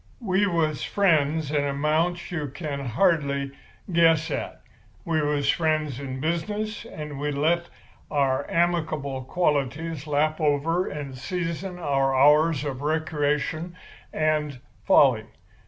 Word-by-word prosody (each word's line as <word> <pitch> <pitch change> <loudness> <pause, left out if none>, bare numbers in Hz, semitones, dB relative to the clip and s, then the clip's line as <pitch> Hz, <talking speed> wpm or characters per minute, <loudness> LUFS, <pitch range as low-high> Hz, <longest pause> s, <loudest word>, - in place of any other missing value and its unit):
We 200 0 +2
was 160 -5 0
friends 160 -6 +2
an 145 -2 +1
amount 155 +6 0
you 155 -4 -2
could 140 +1 -5
hardly 140 - +1 0.4
guess 165 -1 +4
at. - - -4 0.4
We 160 -2 +1
was 145 -1 0
friends 155 -4 +1
in 130 -2 -5
business, 210 - -2
and 150 -9 -7
we 145 +1 -1
let 165 +5 +1 0.4
our 140 -2 0
amicable 155 -6 0
qualities 150 0 -1
lap 155 +2 +1
over 155 +4 +1
and 140 -3 -6
season 180 +4 -4
our 135 -5 +1
hours 150 +2 +4
of 135 -2 -4
recreation 155 +2 -1 0.4
and 150 -3 0 0.3
folly. - - +5
155 Hz, 120 wpm, -25 LUFS, 140-165 Hz, 0.4 s, folly